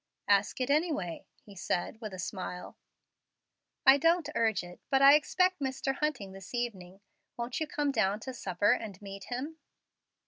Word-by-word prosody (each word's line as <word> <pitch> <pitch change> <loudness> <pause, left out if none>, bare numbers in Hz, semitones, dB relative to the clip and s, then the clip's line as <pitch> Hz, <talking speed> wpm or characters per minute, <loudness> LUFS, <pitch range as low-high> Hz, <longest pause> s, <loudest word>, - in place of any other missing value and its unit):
"Ask 200 +3 +3
it, 255 +2 0
anyway," 290 - 0 0.2
he 200 - -14
said, 190 +4 -2
with 215 -2 -5
a 185 - -7
smile. 180 -1 -5 1.1
"I 265 +1 +9
don't 330 0 +3
urge 220 -7 +1
it, 175 0 -11
but 270 - +4
I 275 +1 +9
expect 365 +5 +3
Mr. 270 0 -2
Hunting 270 -11 -2
this 195 +4 -9
evening. 195 -6 -4 0.4
Won't 240 +1 -3
you 315 - -1
come 295 -1 0
down 210 -5 +1
to 260 - -6
supper 200 -3 +1
and 205 -4 -2
meet 195 -1 -9
him?" 275 +6 -5
235 Hz, 165 wpm, -30 LUFS, 195-280 Hz, 1.1 s, I